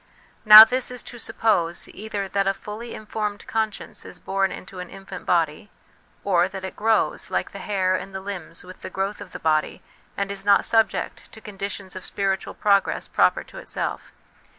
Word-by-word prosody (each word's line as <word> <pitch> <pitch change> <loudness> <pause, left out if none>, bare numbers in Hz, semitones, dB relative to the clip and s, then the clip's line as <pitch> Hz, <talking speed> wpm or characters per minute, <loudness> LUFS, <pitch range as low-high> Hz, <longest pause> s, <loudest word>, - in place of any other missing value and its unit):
Now 215 0 +13
this 255 +3 0
is 250 -1 -6
to 240 - -9
suppose, 175 -7 0
either 205 -1 -5
that 195 0 0
a 195 - +1
fully 225 +3 -8
informed 210 -1 -4
conscience 220 -2 -3
is - - -10
born 195 0 0
into 185 0 -9
an 180 - -7
infant 195 -1 -10
body, 165 +2 +1 0.5
or 180 -3 +3
that 190 0 -7
it 190 - -7
grows, 220 +1 +1
like - - -2
the - - -8
hair 190 -3 0
and 190 +1 -5
the 190 - -5
limbs, 190 -4 -7
with 185 +1 -13
the - - -6
growth 195 +2 -3
of - - -10
the - - -6
body, 155 -1 0 0.3
and 200 0 -2
is 195 -1 -6
not 200 0 +4
subject 225 -1 0
to 220 - -11
conditions 200 -2 -6
of 185 - -7
spiritual 195 -1 -2
progress 200 -1 +1
proper - - +2
to - - -12
itself. - - -5
195 Hz, 185 wpm, -23 LUFS, 185-210 Hz, 0.5 s, Now